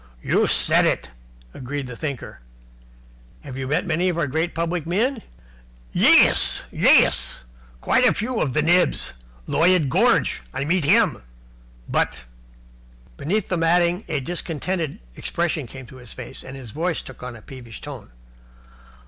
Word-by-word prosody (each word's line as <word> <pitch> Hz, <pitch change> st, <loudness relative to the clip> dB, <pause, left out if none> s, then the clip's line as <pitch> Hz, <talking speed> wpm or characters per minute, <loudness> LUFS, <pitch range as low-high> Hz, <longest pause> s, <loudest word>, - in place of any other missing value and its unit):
"You -, -, +2 dB
said -, -, +5 dB
it," 60 Hz, -, -2 dB, 0.4 s
agreed 135 Hz, +2 st, -5 dB
the 125 Hz, -2 st, -8 dB
Thinker. 140 Hz, -2 st, -6 dB, 1.0 s
"Have 135 Hz, -3 st, -8 dB
you 135 Hz, 0 st, -4 dB
met 155 Hz, +8 st, 0 dB
many 175 Hz, +1 st, +1 dB
of 175 Hz, -, -2 dB
our 170 Hz, -, +1 dB
great 160 Hz, +5 st, -2 dB
public 165 Hz, 0 st, -2 dB
men?" 225 Hz, +8 st, 0 dB, 0.7 s
"Yais -, -, +5 dB
Yais -, -, +4 dB, 0.4 s
Quite -, -, +2 dB
a -, -, +6 dB
few 230 Hz, +2 st, -2 dB
of 135 Hz, -, -1 dB
the 155 Hz, -, +1 dB
nibs 175 Hz, +3 st, +2 dB, 0.3 s
Lloyid 170 Hz, -5 st, +2 dB
Gorge, -, -, +2 dB
I 140 Hz, -, -2 dB
meet 170 Hz, 0 st, +1 dB
him. 205 Hz, +2 st, +3 dB, 0.7 s
But 65 Hz, -, -1 dB, 0.5 s
" -, -, -27 dB
Beneath 195 Hz, +7 st, -1 dB
the 180 Hz, -, 0 dB
matting 175 Hz, +3 st, +2 dB
a 150 Hz, -, -1 dB
discontented 165 Hz, +2 st, -3 dB, 0.2 s
expression 165 Hz, -5 st, -2 dB
came 135 Hz, -, -9 dB
into 130 Hz, +1 st, -13 dB
his 125 Hz, -3 st, -10 dB
face, 125 Hz, -, -10 dB
and 130 Hz, +1 st, -9 dB
his 125 Hz, -5 st, -10 dB
voice 165 Hz, +4 st, -2 dB
took 130 Hz, -, -12 dB
on 125 Hz, -1 st, -7 dB
a 110 Hz, -, -12 dB
peevish 120 Hz, -5 st, -10 dB
note. -, -, -9 dB
155 Hz, 150 wpm, -22 LUFS, 130-175 Hz, 1.0 s, a